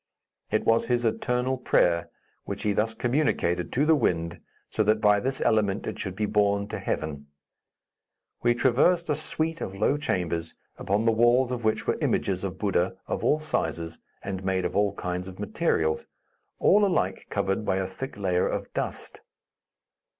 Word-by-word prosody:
It -, -, 0 dB
was 115 Hz, 0 st, +3 dB
his 120 Hz, -1 st, +1 dB
eternal 125 Hz, +3 st, 0 dB
prayer, 85 Hz, -8 st, +2 dB, 0.4 s
which -, -, -5 dB
he 105 Hz, -, +1 dB
thus 110 Hz, +3 st, 0 dB
communicated 120 Hz, -, 0 dB
to 140 Hz, +4 st, +2 dB
the 160 Hz, -, +5 dB
wind, 85 Hz, -, 0 dB, 0.3 s
so -, -, -1 dB
that 110 Hz, +1 st, +3 dB
by 105 Hz, -1 st, +4 dB
this 130 Hz, +4 st, -2 dB
element 105 Hz, -2 st, +1 dB
it -, -, -5 dB
should 95 Hz, -2 st, -4 dB
be 105 Hz, +2 st, 0 dB
borne 100 Hz, -1 st, +1 dB
to -, -, -4 dB
Heaven. 75 Hz, -2 st, -3 dB, 1.1 s
We 120 Hz, 0 st, +3 dB
traversed 150 Hz, +8 st, +3 dB
a -, -, +2 dB
suite 160 Hz, +2 st, -2 dB
of 95 Hz, -, -4 dB
low 110 Hz, +8 st, +2 dB
chambers, 85 Hz, -, -2 dB, 0.2 s
upon 100 Hz, +3 st, 0 dB
the 115 Hz, -, +5 dB
walls 120 Hz, +3 st, +3 dB
of 120 Hz, -2 st, -3 dB
which 110 Hz, 0 st, 0 dB
were -, -, 0 dB
images -, -, 0 dB
of -, -, -4 dB
Buddha, -, -, 0 dB
of -, -, -3 dB
all 150 Hz, -, +3 dB
sizes 85 Hz, -, -3 dB, 0.2 s
and 95 Hz, -1 st, -4 dB
made 95 Hz, -1 st, 0 dB
of -, -, -3 dB
all 100 Hz, 0 st, +2 dB
kinds 90 Hz, +1 st, -4 dB
of 95 Hz, -1 st, -9 dB
materials, 80 Hz, -1 st, 0 dB, 0.5 s
all 205 Hz, +2 st, +4 dB
alike 195 Hz, -3 st, 0 dB
covered 95 Hz, +2 st, -1 dB
by 95 Hz, -, 0 dB
a 95 Hz, 0 st, 0 dB
thick 100 Hz, +7 st, -7 dB
layer 90 Hz, -3 st, +1 dB
of -, -, -4 dB
dust. -, -, -4 dB
105 Hz, 170 wpm, -26 LUFS, 95-125 Hz, 1.1 s, the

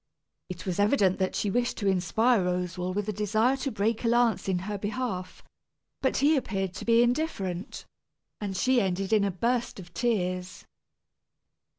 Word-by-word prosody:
It 180 Hz, 0 st, -7 dB
was 185 Hz, 0 st, -2 dB
evident 205 Hz, -3 st, +3 dB
that 190 Hz, -1 st, 0 dB
she 205 Hz, -, 0 dB
wished 240 Hz, +3 st, 0 dB
to 200 Hz, -, -1 dB
inspire 195 Hz, +4 st, +2 dB
Roswal 180 Hz, 0 st, -2 dB
with 205 Hz, 0 st, -2 dB
a 215 Hz, -, -1 dB
desire 215 Hz, +5 st, +2 dB
to 270 Hz, 0 st, -3 dB
break 215 Hz, +3 st, -1 dB
a -, -, +1 dB
lance 235 Hz, -3 st, +2 dB
in 185 Hz, -, +1 dB
her 210 Hz, 0 st, -3 dB
behalf; 205 Hz, -3 st, -4 dB, 0.6 s
but 265 Hz, -, +1 dB
he 295 Hz, +3 st, +4 dB
appeared 195 Hz, -8 st, -2 dB
to -, -, -7 dB
be 230 Hz, 0 st, +5 dB
indifferent, 235 Hz, -, -2 dB, 0.5 s
and 195 Hz, -3 st, -4 dB
she 255 Hz, +2 st, +3 dB
ended 190 Hz, +1 st, -1 dB
in 210 Hz, -2 st, +4 dB
a 200 Hz, -, +1 dB
burst 235 Hz, +5 st, -1 dB
of 175 Hz, -1 st, -12 dB
tears. 185 Hz, -4 st, -2 dB
205 Hz, 170 wpm, -28 LUFS, 185-240 Hz, 0.6 s, be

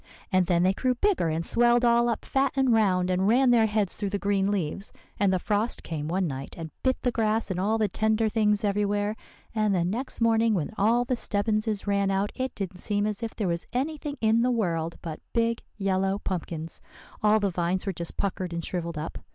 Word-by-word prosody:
And 185 Hz, -2 st, +3 dB
then 175 Hz, -1 st, +3 dB
they 190 Hz, +1 st, +3 dB
grew 255 Hz, +5 st, 0 dB
bigger, 380 Hz, -, +1 dB
and 160 Hz, +1 st, -2 dB
swelled 240 Hz, +3 st, +3 dB
all 235 Hz, 0 st, +4 dB
up 230 Hz, -, -2 dB
fat 270 Hz, 0 st, +1 dB
and 265 Hz, -3 st, +3 dB
round, 185 Hz, -4 st, +2 dB
and 185 Hz, +1 st, +1 dB
ran 250 Hz, +3 st, +4 dB
their 225 Hz, -2 st, +5 dB
heads 210 Hz, -3 st, 0 dB
through 205 Hz, -2 st, -3 dB
the 200 Hz, -, -1 dB
green 200 Hz, -1 st, +1 dB
leaves; 195 Hz, 0 st, -2 dB, 0.3 s
and 200 Hz, -2 st, +3 dB
the 185 Hz, -, +2 dB
frost 210 Hz, +5 st, -1 dB
came 150 Hz, -2 st, -4 dB
one 185 Hz, +3 st, 0 dB
night, 135 Hz, -3 st, -5 dB
and 160 Hz, -2 st, -6 dB
bit 260 Hz, -1 st, +1 dB
the 250 Hz, -, +2 dB
grass 220 Hz, -2 st, 0 dB
and 180 Hz, -, -2 dB
all 210 Hz, +4 st, +1 dB
the 215 Hz, -1 st, +2 dB
tender 220 Hz, +3 st, +1 dB
things 210 Hz, -1 st, +1 dB
everywhere, 205 Hz, +1 st, 0 dB, 0.4 s
and 215 Hz, -3 st, +1 dB
the 170 Hz, -2 st, +1 dB
next 235 Hz, +9 st, -3 dB
morning 225 Hz, -1 st, +3 dB
when 170 Hz, +1 st, -2 dB
all 230 Hz, +4 st, +3 dB
the 255 Hz, -, 0 dB
Stebbinses 215 Hz, -1 st, -1 dB
ran 200 Hz, -1 st, +1 dB
out, 195 Hz, +1 st, 0 dB
it 260 Hz, 0 st, -3 dB
didn't 190 Hz, -3 st, -5 dB
seem 205 Hz, +1 st, 0 dB
as 210 Hz, 0 st, -3 dB
if 230 Hz, -1 st, -4 dB
there 210 Hz, -, -1 dB
was 170 Hz, -1 st, -2 dB
anything 290 Hz, +2 st, -2 dB
in 225 Hz, +1 st, +3 dB
the 250 Hz, -, +2 dB
world 170 Hz, -8 st, -1 dB
but 160 Hz, -3 st, -5 dB
big 230 Hz, 0 st, +1 dB, 0.2 s
yellow 195 Hz, -1 st, +1 dB
pumpkins. 170 Hz, -4 st, -4 dB, 0.4 s
All 215 Hz, +1 st, +4 dB
the 200 Hz, -2 st, 0 dB
vines 175 Hz, +2 st, -1 dB
were 195 Hz, -, -1 dB
just 170 Hz, -1 st, -5 dB
puckered 185 Hz, -3 st, -2 dB
and 170 Hz, -1 st, -3 dB
shrivelled 170 Hz, -3 st, -3 dB
up. 155 Hz, +2 st, -5 dB
205 Hz, 215 wpm, -27 LUFS, 185-230 Hz, 0.4 s, their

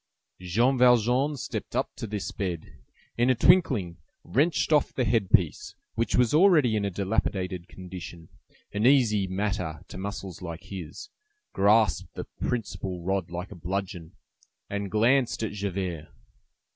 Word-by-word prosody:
Jean 115 Hz, +9 st, +1 dB
Valjean 125 Hz, +4 st, +4 dB
stepped -, -, -5 dB
up -, -, -1 dB
to 115 Hz, -, -6 dB
this 105 Hz, -1 st, -4 dB
bed, 90 Hz, -5 st, -4 dB, 0.5 s
in 120 Hz, +2 st, +4 dB
a 130 Hz, -, +4 dB
twinkling 115 Hz, -, +3 dB, 0.3 s
wrenched 140 Hz, -, +1 dB
off 150 Hz, -, +3 dB
the 130 Hz, -, -1 dB
head 110 Hz, -3 st, +1 dB
piece, 90 Hz, -9 st, +1 dB, 0.2 s
which 115 Hz, +1 st, -1 dB
was 125 Hz, 0 st, +3 dB
already 155 Hz, -, +5 dB
in 105 Hz, -, 0 dB
a 100 Hz, -, 0 dB
dilapidated 95 Hz, -2 st, -2 dB
condition, 90 Hz, -3 st, -9 dB, 0.5 s
an 105 Hz, +3 st, +2 dB
easy 110 Hz, -8 st, +4 dB
matter 95 Hz, -5 st, -2 dB
to -, -, -9 dB
muscles 100 Hz, -2 st, -6 dB
like 85 Hz, -2 st, -7 dB
his, 90 Hz, -6 st, -8 dB, 0.4 s
grasped 105 Hz, -3 st, +2 dB
the -, -, -5 dB, 0.2 s
principal 95 Hz, -6 st, -3 dB
rod 95 Hz, -1 st, -1 dB
like 90 Hz, +2 st, -6 dB
a -, -, -8 dB
bludgeon, 90 Hz, 0 st, -5 dB, 0.6 s
and 100 Hz, 0 st, -3 dB
glanced 115 Hz, +4 st, +2 dB
at 110 Hz, -, -2 dB
Javert. 95 Hz, -6 st, -4 dB
100 Hz, 145 wpm, -27 LUFS, 90-120 Hz, 0.6 s, already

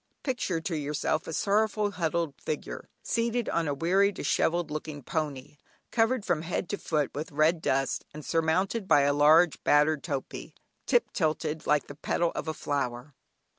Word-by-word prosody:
Picture 245 Hz, -, -1 dB
to 165 Hz, +1 st, -3 dB
yourself 150 Hz, +1 st, -1 dB
a -, -, -4 dB
sorrowful, 210 Hz, +2 st, +1 dB
huddled 170 Hz, -4 st, -1 dB
figure, 155 Hz, -, -5 dB
seated 235 Hz, 0 st, 0 dB
on 165 Hz, -2 st, 0 dB
a 145 Hz, -, 0 dB
weary 190 Hz, +7 st, +3 dB
dishevelled 170 Hz, 0 st, 0 dB
looking 150 Hz, -1 st, -5 dB
pony, 145 Hz, -1 st, -4 dB, 0.3 s
covered 225 Hz, -1 st, +2 dB
from 175 Hz, -4 st, +1 dB
head 175 Hz, +2 st, -3 dB
to 205 Hz, -, -2 dB
foot 150 Hz, -4 st, -1 dB
with 155 Hz, +5 st, -5 dB
red 155 Hz, +3 st, +2 dB
dust, 135 Hz, -2 st, 0 dB
and 150 Hz, 0 st, -9 dB
surmounted 185 Hz, +6 st, 0 dB
by 145 Hz, -, +6 dB
a 140 Hz, 0 st, +3 dB
large 155 Hz, +3 st, +5 dB
battered 150 Hz, 0 st, +3 dB
topee 140 Hz, -5 st, -5 dB, 0.3 s
"tip 485 Hz, -, +2 dB
tilted 155 Hz, -2 st, -1 dB
like 150 Hz, -2 st, +3 dB
the -, -, -9 dB
petal 165 Hz, +3 st, 0 dB
of -, -, -4 dB
a 160 Hz, -, -1 dB
flower." 130 Hz, -1 st, -3 dB
160 Hz, 165 wpm, -28 LUFS, 145-185 Hz, 0.3 s, by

